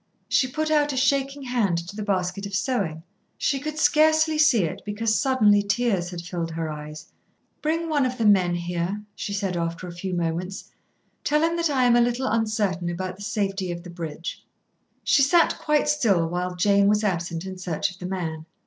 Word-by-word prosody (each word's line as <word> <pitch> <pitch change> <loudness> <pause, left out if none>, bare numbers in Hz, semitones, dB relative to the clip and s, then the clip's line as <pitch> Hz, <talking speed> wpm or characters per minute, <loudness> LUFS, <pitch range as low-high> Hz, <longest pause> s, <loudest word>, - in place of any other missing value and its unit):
She 260 - +2
put 310 +4 -2
out 295 -1 +3
a 265 - -4
shaking 275 +1 +1
hand 235 -9 0
to 200 - -8
the 215 - -5
basket 200 -1 -1
of 200 - -5
sewing. 195 - -1 0.3
She 275 - 0
could 305 +2 -5
scarcely 315 0 +4
see 285 -10 +5
it, 160 - -3
because 215 +2 -1
suddenly 215 -7 +4
tears 200 -3 0
had 175 -2 -6
filled 170 -1 -4
her 160 -1 -3
eyes. 150 +1 -9 0.5
"Bring 325 +2 0
one 300 -3 +2
of 250 0 -5
the 230 - 0
men 185 -4 +4
here," 175 +4 -3
she - - -5
said, 195 -2 -2
after 170 +1 -3
a - - -6
few 180 +2 -4
moments. 175 +3 -3 0.5
"Tell 300 +1 +2
him 335 +1 +2
that 335 -1 +1
I 265 -3 +2
am 240 -1 +5
a 240 - +5
little 240 +2 0
uncertain 215 -7 0
about 185 +1 -4
the - - -13
safety 195 -3 -2
of 170 0 -6
the 180 - -9
bridge." 165 -1 -6 0.6
She 280 - +4
sat 330 +5 +4
quite 300 0 +1
still 225 - +2
while 180 +1 -3
Jane 200 +2 +3
was 210 +1 +3
absent 175 -3 -2
in 190 -1 -7
search 180 -2 -2
of 180 - -15
the 180 - -5
man. 165 -4 -4
200 Hz, 200 wpm, -24 LUFS, 175-260 Hz, 0.6 s, see